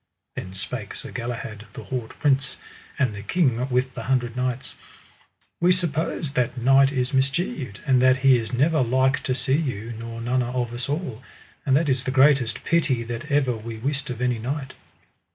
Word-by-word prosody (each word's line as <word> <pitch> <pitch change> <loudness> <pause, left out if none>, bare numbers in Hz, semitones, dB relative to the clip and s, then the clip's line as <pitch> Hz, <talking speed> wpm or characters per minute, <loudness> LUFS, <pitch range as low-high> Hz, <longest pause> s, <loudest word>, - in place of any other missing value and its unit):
Then 95 0 -6
spake 95 - -4
Sir - - -7
Galahad, 115 -2 -5
the - - -8
haut 125 -4 -5
prince, 135 -1 +1 0.4
and 130 -7 +1
the 100 - -7
King 130 - +1
with 130 +1 0
the - - -6
Hundred 125 -3 0
Knights: 125 0 -2 0.9
We 175 +1 +4
suppose 165 -3 0
that 130 -2 0
knight 135 +2 +5
is 130 -1 -1
mischieved, 135 - -1
and 130 -3 +4
that 130 0 +5
he 135 -1 +8
is 115 -2 -2
never 150 +5 +2
like 130 +2 +2
to 130 - -1
see 130 +2 +1
you 120 -7 -3
nor 115 +1 -7
none 125 +2 0
of 120 -1 -2
us 120 +2 -3
all, 140 -6 -3 0.5
and 135 - +4
that 160 +1 +1
is 130 -2 +1
the 130 - -2
greatest 135 -2 +3
pity 145 -8 +1
that 120 +5 -6
ever 135 -4 +2
we 110 +1 -7
wist 140 +5 -2
of 125 -1 -5
any 125 -2 +1
knight. 130 +3 -4
130 Hz, 185 wpm, -24 LUFS, 120-140 Hz, 0.9 s, he